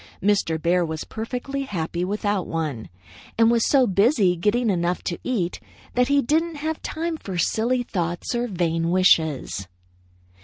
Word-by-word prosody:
Mr. 195 -5 +1
Bear 175 +2 +2
was 160 -1 -4
perfectly 250 +5 -4
happy 175 -8 -3
without 205 0 -1
one, 150 -9 -3 0.5
and 225 0 +5
was 235 -1 +2
so 270 -3 +5
busy 200 -2 +3
getting 210 +6 +1
enough 175 -1 -1
to 175 - -3
eat 195 -9 -1 0.3
that 250 0 +2
he 280 0 +3
didn't 320 +5 +1
have 310 +2 -3
time 325 0 -3
for 190 - -6
silly 240 +8 +1
thoughts 175 -5 -3
or 240 0 0
vain 165 -4 0
wishes. 160 - +2
200 Hz, 150 wpm, -23 LUFS, 170-245 Hz, 0.5 s, and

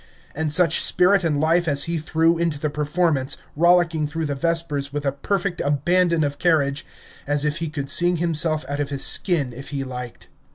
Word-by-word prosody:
And 155 0 -2
such 165 0 +3
spirit 185 +1 +3
and 150 -4 0
life 165 +3 +1
as 140 -2 +2
he 170 -1 -1
threw 165 +2 +1
into 165 -4 -1
the 150 0 -2
performance, 150 -2 0 0.2
rollicking 170 -1 +2
through 160 +2 -4
the 145 - -2
Vespers 150 -2 -1
with 145 0 -4
a 140 - +1
perfect 175 +5 -3
abandon 170 +3 +1
of 145 0 -3
carriage, 145 -5 +1 0.4
as 145 0 0
if 150 +1 -1
he 165 -2 -4
could 145 -2 -5
sing 175 +4 +3
himself 160 -2 0
out 140 +1 -4
of 145 -1 -2
his 140 -1 +1
skin 150 -10 +1
if 135 +3 -8
he 140 -2 -4
liked. 125 -2 -8
155 Hz, 195 wpm, -22 LUFS, 145-170 Hz, 0.4 s, such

